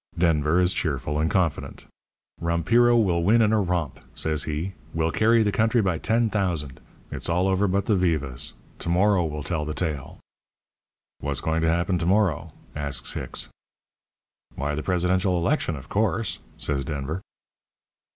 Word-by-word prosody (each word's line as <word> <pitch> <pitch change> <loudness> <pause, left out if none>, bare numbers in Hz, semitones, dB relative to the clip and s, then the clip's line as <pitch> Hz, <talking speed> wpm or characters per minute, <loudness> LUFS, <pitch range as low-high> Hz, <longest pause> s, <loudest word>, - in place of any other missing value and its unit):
Denver 80 -1 +2
is 90 0 +3
cheerful 75 -1 -2
and 80 +1 +1
confident. 90 -7 -1 0.6
'Rompiro 115 +9 +3
will 90 -7 +2
win 105 +7 +4
in 110 -1 +3
a 110 - +3
romp,' 85 -6 -2 0.2
says 75 -2 +1
he. 80 +5 -3 0.2
'We'll 80 0 +1
carry 115 +3 +4
the 105 - +1
country 110 +3 +2
by 95 -6 +1
10,000. 100 - 0 0.3
It's - - -3
all 90 +3 +2
over 95 +2 +2
but 100 +1 0
the 105 - +2
vivas. 75 -9 0 0.3
To - - -3
morrow 95 +1 +3
will 75 -2 -4
tell 80 -2 -1
the 75 0 -4
tale.' 75 -6 -3 1.0
"'What's 70 -1 -1
going 80 +1 0
to 80 - +2
happen 85 +2 +1
to 85 - -1
morrow?' 95 -5 +1 0.2
asks 70 -2 -2
Hicks. - - -5 1.1
"'Why, 70 +2 -2
the 75 - -2
presidential 90 +1 +1
election, 85 - 0
of 70 0 -10
course,' 110 0 0 0.2
says 70 -2 0
Denver. 75 +5 -4
85 Hz, 155 wpm, -25 LUFS, 75-100 Hz, 1.1 s, win